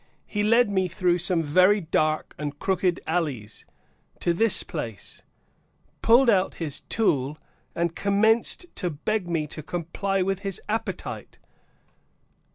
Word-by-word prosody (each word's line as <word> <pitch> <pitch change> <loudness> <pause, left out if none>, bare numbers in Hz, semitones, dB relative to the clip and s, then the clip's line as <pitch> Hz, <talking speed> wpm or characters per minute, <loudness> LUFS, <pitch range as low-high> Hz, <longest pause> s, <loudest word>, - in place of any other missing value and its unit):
He 205 - -3
led 230 +3 +4
me 190 -2 0
through 180 +1 +1
some 175 -1 +2
very 185 +7 +4
dark 155 -3 0
and 145 -1 -4
crooked 185 -1 0
alleys, 145 -11 -3 0.5
to 175 - +1
this 225 +4 +4
place, 115 - -6 0.8
pulled 240 +3 +5
out 195 -5 +3
his 155 -4 -1
tool, 145 - 0 0.4
and 170 -1 -1
commenced 220 - +2
to 180 - -1
beg 180 +5 -2
me 165 -3 0
to 155 +1 -7
comply 180 +4 -2
with 195 0 -1
his 195 -2 -3
appetite. 220 +2 -4
180 Hz, 130 wpm, -25 LUFS, 155-205 Hz, 0.8 s, pulled